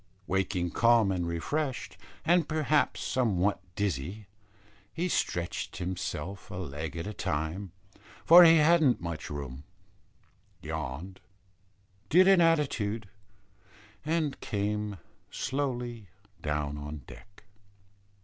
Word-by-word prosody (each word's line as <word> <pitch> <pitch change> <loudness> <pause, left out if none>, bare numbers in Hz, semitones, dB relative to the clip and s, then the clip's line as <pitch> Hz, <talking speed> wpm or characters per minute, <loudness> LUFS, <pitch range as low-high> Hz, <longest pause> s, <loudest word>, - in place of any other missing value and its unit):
Waking 95 -2 -1
calm 115 -4 +4
and 90 -2 -1
refreshed, 130 - -3 0.3
and 170 -1 +3
perhaps 155 -1 +1
somewhat 105 -6 +1 0.2
dizzy, 100 +1 -2 0.7
he 175 +8 -2
stretched 90 - -2
himself 90 0 -4
a - - -7
leg 80 -3 -5
at 80 - -4
a 105 - -5
time, 80 +4 -3 0.5
for 175 +2 +10
he 165 -1 +8
hadn't 155 -4 +4
much 85 -2 -5
room, 70 -1 -6 1.0
yawned, 80 +4 -5 0.9
did 185 +3 +6
an 195 -2 +6
attitude, 120 - +1 0.9
and 155 -2 -1
came 105 0 -2 0.3
slowly 125 -5 -3 0.3
down 75 -1 -2
on 75 -1 -7
deck. 100 0 -15
100 Hz, 100 wpm, -29 LUFS, 85-140 Hz, 1.0 s, for